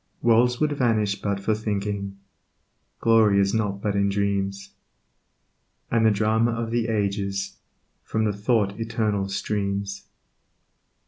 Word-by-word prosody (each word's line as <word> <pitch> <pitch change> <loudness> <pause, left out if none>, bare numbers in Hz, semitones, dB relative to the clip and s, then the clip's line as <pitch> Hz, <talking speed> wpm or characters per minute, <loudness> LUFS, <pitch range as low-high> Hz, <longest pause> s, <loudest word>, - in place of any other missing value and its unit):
Worlds 120 +1 +4
would 150 -1 +1
vanish 110 -7 0
but 100 -1 -1
for 105 +2 0
thinking; 100 -2 -3 0.8
Glory 110 -3 +4
is 100 0 +2
not 100 -3 -1
but 105 -1 0
in 100 0 +2
dreams; 100 0 -2 1.2
And 115 -1 +3
the - - +7
Drama 110 +2 +2
of 115 0 -3
the 120 -1 0
ages 100 -2 -2 0.4
From 110 - -1
the 105 -1 +1
Thought 105 -1 0
Eternal 105 -3 -1
streams. 100 0 -3
105 Hz, 125 wpm, -24 LUFS, 100-115 Hz, 1.2 s, the